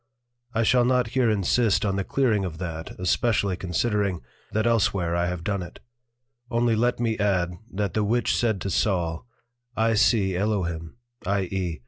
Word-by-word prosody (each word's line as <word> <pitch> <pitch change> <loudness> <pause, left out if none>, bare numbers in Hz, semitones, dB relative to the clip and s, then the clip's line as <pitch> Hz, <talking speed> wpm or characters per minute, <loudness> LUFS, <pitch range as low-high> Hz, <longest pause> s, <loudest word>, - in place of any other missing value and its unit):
I 115 - +2
shall 125 +2 +4
not 125 -1 +2
here 125 -1 +2
insist 105 +2 +2
on 100 -1 0
the 100 - -1
clearing 115 -4 +1
of 85 -4 -5
that, 80 -2 -5
especially 100 +1 +1
considering, 95 +1 -1 0.3
that 110 +1 0
elsewhere 100 -7 +1
I 85 0 +1
have 90 -1 -4
done 100 +1 -1
it: 85 - -9 0.7
only 120 -2 +2
let 120 +2 +1
me 115 -2 -1
add, 95 -4 +1 0.2
that 100 -2 -2
the 110 - +1
Witch 115 +3 +1
said 110 -5 0
to 100 - -3
Saul, 85 -1 0 0.5
I 115 0 +3
see 105 -3 +3
Elohim, 90 -5 -2 0.3
i. 100 +1 +1
e. 90 -3 -3
100 Hz, 165 wpm, -25 LUFS, 90-115 Hz, 0.7 s, shall